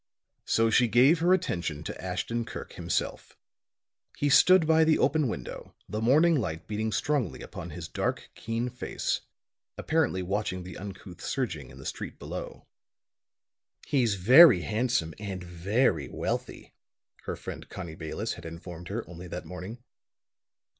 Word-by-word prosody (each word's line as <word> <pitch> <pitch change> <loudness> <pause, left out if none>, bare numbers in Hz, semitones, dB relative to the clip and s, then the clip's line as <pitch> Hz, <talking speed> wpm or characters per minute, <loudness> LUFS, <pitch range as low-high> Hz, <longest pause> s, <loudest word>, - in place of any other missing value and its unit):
So 115 0 +2
she 120 +1 +5
gave 130 +9 +5
her 175 +2 +3
attention 85 - 0
to - - -7
Ashton 95 +6 -2
Kirk - - -8
himself. - - -3 0.8
He 145 - +1
stood 185 +4 +7
by 160 0 +5
the 160 0 +4
open 155 -3 +2
window, 70 - -6
the 105 +1 -3
morning 150 +9 +5
light 90 - -2
beating 110 +1 -2
strongly 125 - -1
upon 85 - -8
his 80 0 -7
dark, - - -3
keen 115 +2 -3
face, 125 0 -2 0.6
apparently 155 - +1
watching 95 -1 -2
the 90 -1 -9
uncouth 95 -2 -9
surging 85 - -3
in 65 - -13
the 65 - -11
street - - -5
below. - - -7 1.2
"He's 120 -7 +2
very 125 - +8
handsome 110 -5 0
and 95 -3 -5
very 90 - +1
wealthy," - - -4 0.5
her - - -3
friend - - -8
Connie 85 -4 -7
Bayless 80 +8 -4
had 85 - -11
informed 85 +1 -9
her 110 +4 -4
only 90 +1 -9
that 90 +1 -6
morning. 95 +7 -8
105 Hz, 145 wpm, -28 LUFS, 90-130 Hz, 1.2 s, very